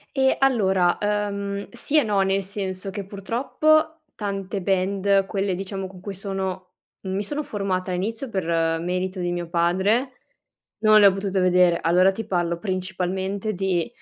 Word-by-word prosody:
E 265 0 +3
allora, 190 -9 +3
ehm, 200 -1 -2
sì 280 +5 -1
e - - +2
no, 205 -3 +1
nel 195 0 +1
senso 195 -1 -4
che 195 0 -5
purtroppo 295 - +1 0.2
tante 200 -1 -3
band, 195 +1 +1
quelle 195 -2 -1
diciamo 195 +1 -4
con 185 -1 -10
cui 195 +1 -6
sono 190 -1 -4 0.4
mi 190 +1 -2
sono 295 +8 -3
formata 195 -6 -2
all'inizio 220 +8 -3
per 195 -6 -2 0.4
merito 185 +2 -2
di 175 0 -1
mio 175 -1 -3
padre, 190 +9 +1 0.7
non 215 -1 +6
le 205 - +7
ho 195 - +7
potute 195 0 -2
vedere. 180 -2 +4
Allora 180 +3 +4
ti 225 +4 -5
parlo 175 -2 -1
principalmente 190 +2 -2
di, 190 -2 -1
195 Hz, 155 wpm, -23 LUFS, 185-205 Hz, 0.7 s, le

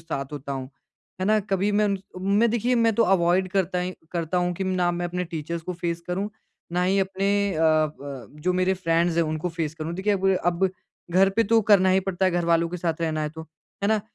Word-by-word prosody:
साथ 140 -3 -5
होता 140 -1 -5
हूँ। 130 -1 -5 0.5
है - - 0
ना? 215 +1 +4
कभी 200 0 0
मैं 210 +1 +3 0.3
उनमें 200 +5 +2
देखिए 240 +2 +1
मैं 230 -1 +3
तो 230 - +4
अवॉइड 185 -1 +3
करता 185 -2 0
ही 180 +1 -2 0.2
करता 170 +1 -1
हूँ 180 0 0
कि 190 +2 -3
ना 185 -2 +1
मैं 175 0 -2
अपने 180 +1 -3
टीचर्स 165 0 -5
को 180 - -4
फेस 170 -1 -3
करूँ। 190 +4 -2 0.4
ना 180 +1 +1
ही 190 +2 +2
अपने 195 +1 0 0.3
अ 160 - 0
अ, 150 -5 0
जो 180 +4 +1
मेरे 185 +1 +2
फ्रेंड्स 170 -1 +1
हैं 170 - +4
उनको 155 +2 -2
फेस 165 -2 -3
करूँ। 160 +1 -5
देखिए 200 +3 0
अब 195 - 0
मुझे 190 -1 +4
अब 175 +2 +2 0.4
घर 190 +2 +5
पे 230 +4 +2
तो 225 +2 +4
करना 190 -3 +6
ही 190 +1 +4
पड़ता 190 0 -1
है 185 - +4
घरवालों 170 -1 +2
के 180 - -5
साथ 165 -2 -2
रहना 160 -2 -1
है 150 - -1
तो। 160 0 -9 0.4
है 200 - +2
ना? 220 -1 +2
180 Hz, 235 wpm, -25 LUFS, 165-195 Hz, 0.5 s, करना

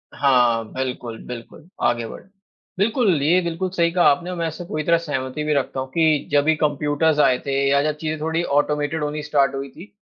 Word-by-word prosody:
हाँ, 125 -4 +3
बिल्कुल, 125 -3 -4
बिल्कुल। 125 +6 -9 0.2
आगे 120 -1 +1
बढ़ें। - - -11 0.5
बिल्कुल, 205 - +2
ये 165 +6 +4
बिल्कुल 170 +2 -3
सही 170 -1 +2
कहा 175 0 +2
आपने। 170 +6 0
मैं 170 -1 -2
इससे 160 +2 -6
पूरी 155 -2 -3
तरह 170 +2 +3
सहमति 145 -3 -4
भी 150 0 0
रखता 135 -1 -1
हूँ 130 - -3
कि 155 -1 +2
जब 145 -1 +4
भी 160 0 +3
कंप्यूटर्स 150 +1 +1
आए 130 -3 +4
थे 140 - -2 0.2
या 140 0 +3
जब 155 0 0
चीज़ें 155 0 -3
थोड़ी 160 +2 -1
ऑटोमेटेड 150 +1 0
होनी 150 +1 -3
स्टार्ट 140 -2 +1
हुई 135 0 -5
थी, 175 +8 -14
150 Hz, 205 wpm, -22 LUFS, 140-165 Hz, 0.5 s, ये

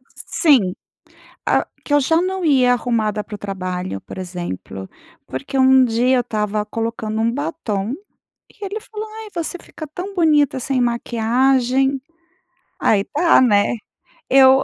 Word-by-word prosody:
Sim. 255 - +2 0.7
Ah, - - +2 0.2
que 290 - -3
eu 290 - +6
já 325 +4 +2
não 375 +1 -2
ia 260 -5 +4
arrumada 220 -4 0
para 210 - -8
o - - -8
trabalho, 185 - -4
por - - -10
exemplo, 175 - -6 0.4
porque 135 - -4
um 260 0 +6
dia 250 +2 +2
eu - - +3
estava 210 -2 -2
colocando 225 0 -3
um 230 +1 +2
batom 245 -7 -3 0.6
e 410 - -9
ele 400 +3 -4
falou: 435 0 -7 0.2
"Ai, - - -9
você 340 +1 -2
fica 310 - -9
tão 360 +7 -7
bonita 300 -6 +3
sem 260 +1 -1
maquiagem". 250 +3 +1 0.8
Aí 200 -2 +3
tá, 335 +3 +4
né, 210 -3 +3 0.6
eu 265 0 +7
245 Hz, 145 wpm, -20 LUFS, 210-290 Hz, 0.8 s, eu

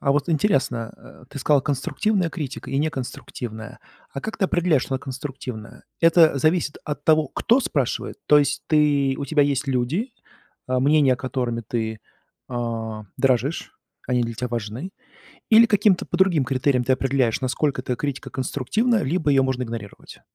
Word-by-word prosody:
А 140 - +2
вот 145 +4 0
интересно, 135 - 0
э, - - -16
ты 140 - -8
сказал: 140 +1 +3
"Конструктивная 170 - 0
критика 150 -6 -6
и 135 - 0
неконструктивная". 125 -6 -5 0.3
А 135 - -5
как 220 - -5
ты 195 - 0
определяешь, 175 -7 +2
что 135 - -3
она - - 0
конструктивная? 130 -4 -7 0.2
Это 165 -3 +5
зависит 155 +1 +1
от 150 -1 -5
того, 155 -2 +4
кто 240 - +2
спрашивает, 140 - -2
то 150 - +7
есть 145 0 0
ты 145 -3 +3
у 140 - -3
тебя 145 +1 +2
есть 140 0 0
люди, 135 - -1 0.6
э, 130 0 +1
мнения, 140 -1 +4
которыми 125 -3 -3
ты, 110 -2 -3 0.5
э, 115 -3 -4 0.2
дорожишь, 135 +3 0 0.4
они 125 -1 +2
для 115 0 -3
тебя 125 +2 -3
важны, 120 - -4 0.6
или 225 +1 +8
каким-то 205 -3 +3
по 175 - -3
другим 175 -8 +3
критериям 130 -1 +1
ты 130 - +2
определяешь, 130 -3 +1
насколько 135 +1 -1
эта 125 -1 -2
критика 140 0 -4
конструктивна, 200 - 0
либо 150 +1 0
её 135 -1 +4
можно 130 -1 -1
игнорировать? 115 -3 -9
140 Hz, 160 wpm, -23 LUFS, 125-155 Hz, 0.6 s, или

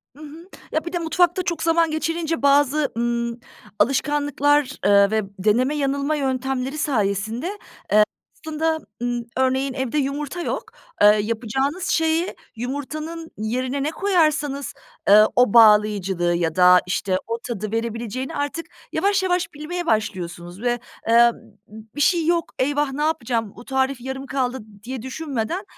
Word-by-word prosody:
Hı 300 - -12
hı. 315 +4 -11 0.2
Ya, 315 - -1
bir 340 - -6
de 350 - 0
mutfakta 350 +2 +1
çok 340 -2 -2
zaman 330 -1 +3
geçirince 330 +1 -2
bazı, 285 +1 +3
ımm, 235 0 -1 0.4
alışkanlıklar, 290 +1 +2 0.2
eee, 200 0 +5
ve 220 0 +2 0.2
deneme, 240 +9 +2
yanılma 280 +1 0
yöntemleri 265 0 -2
sayesinde, 220 - -1
eee, 410 +2 -5 0.9
aslında, 315 +1 0 0.2
ımm, 240 -1 -2
örneğin 260 +1 +1
evde 265 +2 -2
yumurta 290 +4 -2
yok. - - -2 0.4
Eee, 205 - +8 0.2
yapacağınız 260 - -2
şeyi 325 +2 +1 0.2
yumurtanın 305 +6 -5
yerine 255 +5 -2
ne 295 - 0
koyarsanız, 305 -7 0 0.4
ııı, 210 +1 +8
o 245 -4 +4
bağlayıcılığı 210 -5 +4
ya 165 -1 -1
da, 180 0 +7
işte, 185 +1 0
o 230 0 -3
tadı 215 -3 -4
verebileceğini 230 +2 -3
artık 290 +3 -3 0.3
yavaş 400 -1 +1
yavaş 355 -2 0
bilmeye 340 +4 -5
başlıyorsunuz 180 - -2
ve, 240 -1 0 0.3
eee, 235 +1 +6 0.4
"B 220 +1 -11
bir - - -4
şey 330 +2 +3
yok. 340 -1 0
Eyvah! 290 +1 0
Ne 290 +2 -3
yapacağım? 235 -9 -1
Bu 240 - -11
tarif 265 0 -1
yarım 265 +2 -6
kaldı." 260 -2 -1 0.2
diye 250 +1 -6
düşünmeden 275 - -3
270 Hz, 140 wpm, -22 LUFS, 230-310 Hz, 0.9 s, Eee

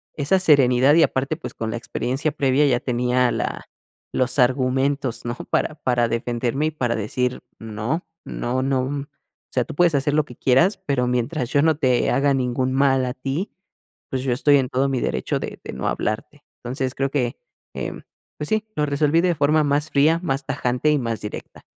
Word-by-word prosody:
Esa 150 +6 +2
serenidad, 140 -4 +5
y 165 - +6
aparte, 135 +4 0
pues, - - -7
con 110 -1 -3
la - - -3
experiencia 130 +5 -2
previa 140 0 +2
ya 120 -2 +2
tenía 125 0 +1
la - - -4 0.4
los 130 +2 +1
argumentos, 130 +1 +1
¿no? 120 0 -2 0.2
Para 155 - 0
para 120 -5 +1
defenderme, 120 +5 -1
y - - -2
para 125 -6 -1
decir: 125 +4 -2 0.2
"No, 110 +9 -3 0.2
no, 125 +2 -2
no. 135 -1 +1
O 145 0 -4 0.5
sea, - - +2
tú - - -8
puedes 175 0 +3
hacer 140 +1 +1
lo 155 -1 +2
que 125 - -12
quieras, 170 +10 +3
pero 130 -3 +1
mientras 125 +2 -1
yo 145 - +3
no 160 -2 +3
te 130 -5 +2
haga 140 0 +2
ningún 130 0 -1
mal 135 -1 +3
a 125 - -3
ti, 135 +9 -3 0.6
pues, 130 -1 -2
yo 130 -2 +1
estoy 145 +2 +4
en 130 -2 0
todo 135 +2 +1
mi 130 -2 -1
derecho 65 - -1
de - - -6
de - - -6
no - - -3
hablarte". 125 +7 -3 0.2
Entonces, 130 +1 -3
creo 135 0 -1
que, 125 -5 -1 0.4
em, - - -5 0.4
pues 150 - -2
sí, 220 0 0
lo 150 - +1
resolví 150 +3 +2
de 175 -2 +1
forma 150 +2 +3
más 145 +1 0
fría, 155 +4 +4
más 135 -3 -1
tajante 125 +4 0
y 150 - +3
más 115 -2 -3
directa. 105 - -8
135 Hz, 195 wpm, -22 LUFS, 125-145 Hz, 0.6 s, y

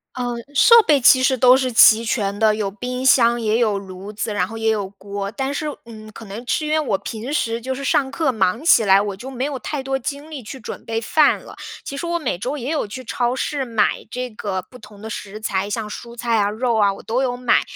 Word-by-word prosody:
呃， 245 -1 -2 0.2
设 465 - +7
备 290 -4 +3
其 255 +1 +6
实 260 0 +2
都 255 +1 +6
是 255 -2 -1
齐 225 0 +7
全 205 -3 -1
的， 215 -1 +4
有 200 -2 -2
冰 250 +5 -5
箱， 235 -2 +5
也 220 +1 +1
有 215 -4 +1
炉 195 +1 -9
子， 215 0 -3
然 180 -2 0
后 225 - -8
也 225 0 0
有 205 -3 -1
锅。 200 0 -6
但 270 +5 -3
是， 305 +1 -3 0.2
呃 215 -2 -12
可 230 - -10
能 215 +5 -8
吃 305 - -1
因 300 - -2
为 315 - +3
我 225 -10 0
平 235 +6 -6
时 230 -6 -1
就 260 +2 -4
是 275 - -7
上 270 0 +1
课 305 -4 0
忙 195 +4 0
起 235 -9 +5
来， 195 0 +5
我 205 -1 -3
就 260 +5 -8
没 260 -1 -4
有 280 -2 -3
太 275 +2 -4
多 270 0 -2
精 285 +5 -6
力 280 -4 -6
去 250 +5 -9
准 220 - -9
备 225 0 -2
饭 300 +5 +3
了。 - - -12 0.3
其 275 - -6
实 340 - -4
我 340 0 -1
每 250 - -2
周 255 +9 -3
也 265 +4 -4
有 295 -9 -1
去 255 +5 -8
超 245 +1 -1
市 275 0 -2
买 225 -3 0
这 250 +1 -4
个 200 -3 -4
不 250 +7 -16
同 210 -1 -15
的 220 - -7
食 210 -1 -7
材， 200 -1 -2
像 215 0 -3
蔬 235 +2 -9
菜 235 -1 0
啊、 205 -1 +2
肉 230 +1 -1
啊， 200 -2 +3
我 - - -12
都 240 +4 -1
有 245 -2 -1
买， 250 0 +2
235 Hz, 275 characters per minute, -20 LUFS, 210-265 Hz, 0.3 s, 设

